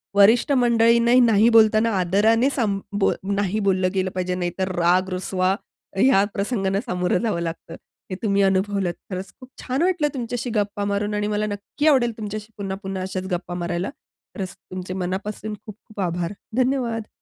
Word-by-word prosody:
वरिष्ठ 220 +7 +5
मंडळींनाही 235 -1 +4
नाही 225 -2 +5
बोलताना 220 0 +5
आदराने 220 +8 +3
सांभ 215 -8 0 0.2
बोल - - +3 0.2
नाही 205 +1 0
बोललं 185 -1 +2
गेलं 185 -1 0
पाहिजे. 180 0 -2
नाहीतर 180 +1 -2
राग, 180 +2 +2
रुसवा 185 0 0 0.4
ह्या 200 -3 +5
प्रसंगांना 200 -2 -1
सामोरं 180 0 0
जावं 210 -7 0
लागतं, 165 0 -5 0.3
हे 185 - -3
तुम्ही 200 -1 +2
अनुभवलंत. 195 -1 +1 0.2
खरचं! 185 +1 -5
खूप 255 -1 -13
छान 260 +3 -2
वाटलं 355 -4 +2
तुमच्याशी 245 -1 -3
गप्पा 205 0 -1
मारून 205 +1 -1
आणि 210 0 -1
मला 210 0 0
नक्की 210 +9 -3
आवडेल 250 -5 +4
तुमच्याशी 215 0 -6
पुन्हा-पुन्हा 195 -1 -4
अशाचं 185 0 -4
गप्पा 175 0 -3
मारायला. 175 +2 -2 0.5
खरचं, 190 -4 -5 0.2
तुमचे 185 0 -5
मनापासून 190 +3 -4
खूप-खूप 215 0 -12
आभार, 175 0 -2 0.2
धन्यवाद! 245 -4 0
200 Hz, 155 wpm, -23 LUFS, 185-230 Hz, 0.5 s, वरिष्ठ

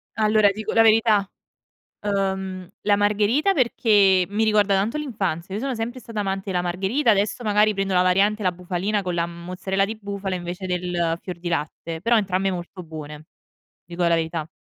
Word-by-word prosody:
Allora, 215 -1 +4
ti 200 - -4
dico 220 0 -4
la 225 - +5
verità: 220 -3 +4 0.7
ehm, 190 -2 -2
la 205 -1 +3
Margherita 210 - +2
perché 205 - +3
mi 210 +3 0
ricorda 210 -2 +3
tanto 205 +9 0
l'infanzia. 195 - -3
Io 210 - -2
sono 270 0 -2
sempre 235 +2 -4
stata 230 -3 -5
amante 195 0 -3
della 180 -1 0
Margherita, 195 +10 +1
adesso 205 +3 +1
magari 210 -1 +3
prendo 195 -1 -1
la 180 - +4
variante, 200 +4 +2
la 185 -2 +1
bufalina 180 +4 -2
con 180 -2 -3
la 170 0 0
mozzarella 185 +3 -2
di 220 +2 -5
bufala 200 -2 -4
invece 180 +1 -5
del 175 -2 -1
fior 180 -2 -7
di 175 0 -5
latte, 165 0 -3
però 230 +2 +3
entrambe 195 -1 0
molto 180 +1 -6
buone. 155 -2 -8
Ti 155 - -16 0.6
dico 175 +1 -4
la 170 - +4
verità. 160 -1 -2
195 Hz, 185 wpm, -23 LUFS, 180-215 Hz, 0.7 s, la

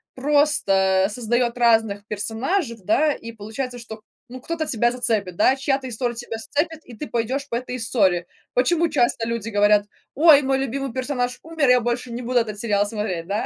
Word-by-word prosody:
просто 200 -10 +2
создаёт 240 +2 -1
разных 225 -4 +2
персонажей, 230 - -2
да, 295 +10 +2
и 230 -3 -9
получается, 230 +4 -6
что, 220 -2 -9 0.3
ну, 255 +1 -10
кто-то 325 +2 -3
тебя 240 0 +1
зацепит, 220 -7 -1
да, 260 +5 +4
чья-то 270 -1 -1
история 240 0 -3
тебя 235 -1 -6
зацепит, 305 +7 -2
и 245 - -13
ты 300 - -6
пойдёшь 255 +5 -2
по 235 - -4
этой 250 +1 -4
истории. 195 -7 +1 0.3
Почему 330 +6 +2
часто 240 -1 +1
люди 230 -2 -3
говорят: 205 -1 +3 0.3
"Ой, 300 -1 +7
мой 270 -1 +1
любимый 270 0 -3
персонаж 250 -1 -2
умер, 320 -4 0
я 250 0 +6
больше 240 +1 -3
не 240 +2 -5
буду 245 0 +1
этот 215 -3 -3
сериал 205 -3 +1
смотреть", 205 -6 -4
да? 205 +2 -1
240 Hz, 180 wpm, -22 LUFS, 215-270 Hz, 0.3 s, Ой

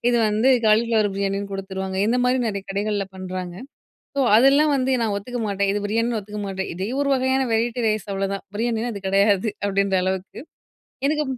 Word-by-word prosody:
இது 240 - +2
வந்து 215 +5 +2 0.2
காலிஃப்ளவர் 220 -1 +3
பிரியாணின்னு 200 0 -2
கொடுத்துருவாங்க. 190 -1 -4
இந்தமாரி 250 +2 +2
நிறைய 200 -2 -3
கடைகள்ல 205 0 -1
பண்றாங்க. 185 -1 -5 0.6
ஸோ, 280 - +2 0.2
அதெல்லாம் 280 +5 +5
வந்து 260 0 0
நான் 210 -2 0
ஒத்துக்க 245 +4 -5
மாட்டேன். 200 -1 0
இது 205 - -1
பிரியாணின்னு 230 +2 0
ஒத்துக்க 210 +1 -7
மாட்டேன். 190 -1 -4
இதே 190 +3 -3
1 285 - +1
வகையான 260 +1 +1
வெரைட்டி 235 +2 0
ரைஸ் 215 -1 -1
அவ்ளதான். 195 0 -2
பிரியாணினா 230 +1 -1
அது 200 -1 -7
கிடையாது 200 +2 +3 0.2
அப்பிடின்ற 200 -1 +1
அளவுக்கு 190 +3 -3 0.7
எனக்கு 300 +1 +1
210 Hz, 165 wpm, -22 LUFS, 195-240 Hz, 0.7 s, அதெல்லாம்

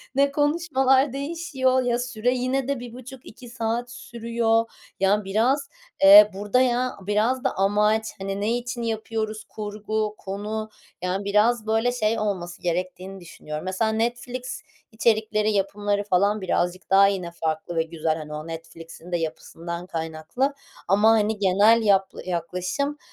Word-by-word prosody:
Ne 280 +1 +3
konuşmalar 280 -3 +2
değişiyor 275 -3 0
Ya, 245 -1 0
süre 245 -1 -1
yine 255 +1 -1
de 280 -2 -1
1,5-2 245 0 -11
saat 235 0 -3
sürüyor. 230 -1 0 0.3
Ya, 200 +2 +2
biraz, 230 +9 +1 0.3
eee, 205 +2 +10
burada 205 +6 +1
ya 250 0 +1
biraz 215 +6 0
da 265 - 0
amaç, 210 +3 +2
hani, 195 +1 -4
ne 225 +3 +1
için 245 0 -5
yapıyoruz? 220 -1 -3
Kurgu, 215 0 -3
konu. 210 +3 -5 0.3
Yani, 185 +2 -2
biraz 215 +3 +2
böyle 225 +2 +2
şey 225 -2 0
olması 185 -5 -3
gerektiğini 185 +2 -3
düşünüyorum. 155 -2 -8
Mesela, 190 +4 0
Netflix 240 +3 -3 0.3
içerikleri, 215 -1 +1
yapımları 205 0 0
falan 200 +2 +1
birazcık 180 0 -1
daha 195 +1 +6
yine 185 -3 -2
farklı 160 0 -3
ve 165 - +2
güzel, 160 -1 -2
hani, 150 -1 -8
o 155 +1 -6
Netflix'in 165 +1 -10
de 175 - +1
yapısından 170 +1 -5
kaynaklı. 165 - -2 0.3
Ama, 205 +4 +4
hani, 215 -1 +2
genel 205 +4 +4
yap 195 -3 +3 0.2
yaklaşım, 180 - -2
215 Hz, 140 wpm, -24 LUFS, 190-240 Hz, 0.3 s, eee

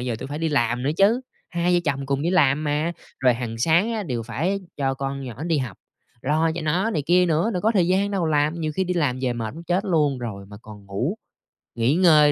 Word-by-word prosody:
giờ 125 -2 -2
tui - - -6
phải 145 +2 -5
đi 165 0 0
làm 120 -4 +1
nữa 140 - +1
chứ, 215 +6 +4 0.3
hai 175 0 +1
vợ 175 - +3
chồng 140 -2 -1
cùng 140 0 -1
đi 170 - +1
làm 150 -4 +3
mà. 150 +3 0 0.3
Rồi 125 -2 +4
hàng 115 -2 -5
sáng 170 - +3
á 220 -2 -2
đều 125 -9 -3
phải 160 - -2 0.2
cho 135 -2 0
con 135 0 -4
nhỏ 130 +5 -6
đi 165 -3 +1
học, 125 -4 -4 0.5
lo 155 +4 +2
cho 175 - -4
nó 180 +9 +1
này 150 -9 -1
kia 180 +1 +4
nữa, 165 +7 +1
đâu 180 - -2
có 220 - +3
thời 180 -4 +3
gian 195 +2 +2
đâu 185 -5 0
làm, 155 +2 +1
nhiều 155 -1 -2
khi 190 - +1
đi 180 0 -2
làm 140 -7 0
về 125 -2 +1
mệt 115 +1 -4
muốn 170 +1 -9
chết 180 +3 0
luôn 150 -7 +1
rồi 100 -5 -6
mà 100 0 -11
còn 105 -2 -12
ngủ, 120 - -2 0.6
nghỉ 120 +5 +2
ngơi 155 -5 +6
150 Hz, 255 wpm, -23 LUFS, 130-175 Hz, 0.6 s, ngơi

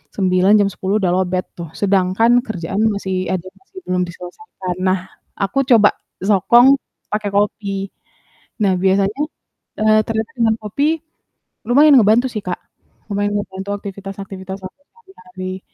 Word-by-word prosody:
9, 185 0 +2
jam 200 - +2
10 195 +2 -2
udah 180 - +1
lowbat 185 -1 0
tuh, 170 -1 -6
sedangkan 195 +3 +3
kerjaan 195 0 -3
masih 190 -1 -3 0.2
ada 185 0 -3
masih 385 0 -13
belum 180 0 0
diselesaikan. 180 +1 -7
Nah, 185 0 +2 0.4
aku 195 +7 -2
coba 220 -4 +6 0.4
sokong 235 +5 +5 0.4
pake 210 -1 -1
kopi. 200 -1 -1 0.7
Nah, 190 -2 +3
biasanya 195 +7 +2 0.6
eee, 215 0 +4
ternyata 220 +3 -2
dengan 225 -2 +2
kopi 215 +8 -1 0.8
lumayan 285 +4 +6
ngebantu 225 +4 +4
sih 215 - -2
Kak. 180 - -1 0.6
Lumayan 205 +1 0
ngebantu 195 0 -6
aktivitas-aktivitas 195 -1 -8
aku 185 - -10
sehari-hari. 185 - -9
200 Hz, 130 wpm, -18 LUFS, 185-215 Hz, 0.8 s, coba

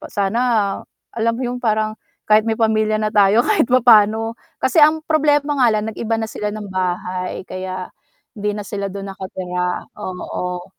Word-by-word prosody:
Pa - - -9
sana, 200 +3 -1 0.7
alam 230 0 0
mo 255 - -4
yung 245 0 -3
parang 215 -2 0 0.3
kahit 215 +1 +4
may 220 - 0
pamilya 215 -1 +2
na 215 0 -1
tayo 210 +3 +4
kahit 405 - +2
papano, 225 -3 +4 0.2
kasi 330 - +2
ang 310 +1 +5
problema 295 -2 +2
nga 245 - +6
lang 215 -1 +1
nag-iba 225 +1 -2
na 225 - -2
sila 210 - -3
ng 210 -2 -6
bahay 185 0 -3
kaya, 185 0 -6 0.4
hindi 210 -2 -3
na 210 - -5
sila 200 0 -4
dun 195 0 -6
nakatira, 180 -1 -4 0.2
oo 180 -1 -5
215 Hz, 165 wpm, -19 LUFS, 190-230 Hz, 0.7 s, nga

